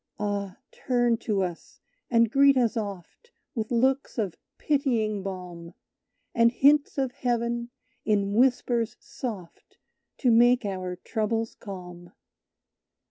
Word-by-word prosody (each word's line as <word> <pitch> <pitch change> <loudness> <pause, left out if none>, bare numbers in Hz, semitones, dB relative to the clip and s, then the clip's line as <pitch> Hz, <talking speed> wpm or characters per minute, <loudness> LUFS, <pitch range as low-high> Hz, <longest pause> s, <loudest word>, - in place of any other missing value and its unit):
"Ah! 200 -2 -3
turn 240 -2 +1
to 210 -4 -1
us, 175 -2 -7 0.3
and 230 -2 +3
greet 275 0 +5
us 240 -2 +2
oft 205 - -6 0.2
With 220 -3 -3
looks 260 +4 +1
of 205 -7 -1 0.2
pitying 235 -8 0
balm, 180 -3 -7 0.6
And 230 -1 +4
hints 285 +4 +3
of 265 -2 0
heaven, 235 -1 -2 0.3
in 200 -2 +1
whispers 240 -1 +1
soft, 205 -9 -8 0.4
To 250 - +2
make 240 +1 +5
our 185 -2 -3
troubles 225 +4 -2
calm. 180 -3 -10
225 Hz, 115 wpm, -26 LUFS, 195-245 Hz, 0.6 s, greet